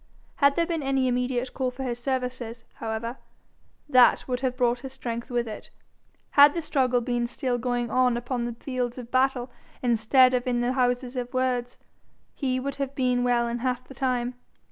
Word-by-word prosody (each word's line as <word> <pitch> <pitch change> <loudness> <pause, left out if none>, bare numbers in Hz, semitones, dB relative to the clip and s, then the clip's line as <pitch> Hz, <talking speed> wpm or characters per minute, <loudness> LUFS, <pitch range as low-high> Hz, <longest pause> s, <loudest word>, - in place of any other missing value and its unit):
Had 280 -1 +4
there 335 - +2
been 335 -2 -2
any 270 -1 +1
immediate 250 0 -1
call 260 -1 -1
for 250 +2 -7
his 245 -2 -3
services, 250 -2 -3
however, 225 +2 -4 0.7
that 255 -4 +5
would 250 -1 -1
have 255 -1 -2
brought 245 -1 +2
his 265 +1 -8
strength 235 -3 -5
with 240 -1 -1
it. 215 - -8 0.6
Had 285 +1 +7
the 335 - -2
struggle 255 -5 +1
been 240 0 -1
still 245 0 -2
going 245 -1 -1
on 250 -1 +3
upon 240 0 -2
the 240 - -3
fields 245 0 -3
of 245 -2 -8
battle 260 -1 +1 0.3
instead 245 +2 +4
of 250 0 0
in 245 -1 +1
the 245 +1 +1
houses 250 0 0
of 245 -1 -3
words, 250 -1 0 0.6
he 255 -3 -1
would 275 +2 -4
have 275 -1 -3
been 250 -2 +1
well 240 -1 +2
in 235 +1 -3
half 250 0 -1
the - - -11
time. 250 -1 -1
250 Hz, 190 wpm, -26 LUFS, 240-260 Hz, 0.7 s, Had